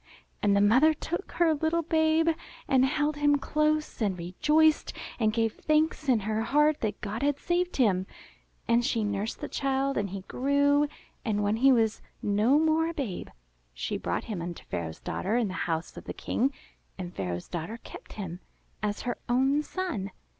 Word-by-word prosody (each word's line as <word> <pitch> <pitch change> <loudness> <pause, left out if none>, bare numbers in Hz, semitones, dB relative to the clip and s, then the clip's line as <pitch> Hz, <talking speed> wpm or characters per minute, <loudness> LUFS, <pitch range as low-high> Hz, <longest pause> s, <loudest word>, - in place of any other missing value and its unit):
And 200 -1 +3
the - - +4
mother 260 +10 +5
took 345 +5 -5
her 335 -2 +3
little 320 +2 0
babe, 320 0 +3 0.4
and 260 -1 +4
held 300 +1 0
him 290 0 +4
close, 305 -1 0
and 200 -4 +1
rejoiced, 300 - +2 0.3
and 215 -2 +3
gave 225 -1 0
thanks 310 -1 +1
in 235 -4 +4
her 215 +2 -1
heart 295 +6 +3
that 210 -2 -2
God 215 +3 -4
had 285 0 +1
saved 350 +3 -1
him. 190 -7 +2 0.6
And 235 +1 +3
she 235 -3 0
nursed 205 +1 -2
the - - -3
child 275 0 0
and 200 -1 -2
he 195 +1 -5
grew, 285 +6 +2 0.4
and 210 -2 0
when 205 +2 +1
he 270 +3 +6
was 225 -4 +2 0.2
no 210 +7 +3
more 320 +1 +3
a 335 - -6
babe, 235 - -4 0.5
she - - -3
brought - - -2
him 205 -6 -4
unto 175 0 -6
Pharaoh's 80 -2 -4
daughter 205 +5 -2
in 230 -5 +1
the - - -5 0.2
house 165 +1 -2
of - - -9
the - - -5
King, 265 +4 0 0.5
and 180 -2 -6
Pharaoh's 90 -2 -4
daughter 175 +6 -5
kept - - -12
him 180 -4 -6 0.4
as 210 0 -2
her 245 - -3
own 265 +4 +3
son. 300 - -3
245 Hz, 180 wpm, -28 LUFS, 205-300 Hz, 0.6 s, he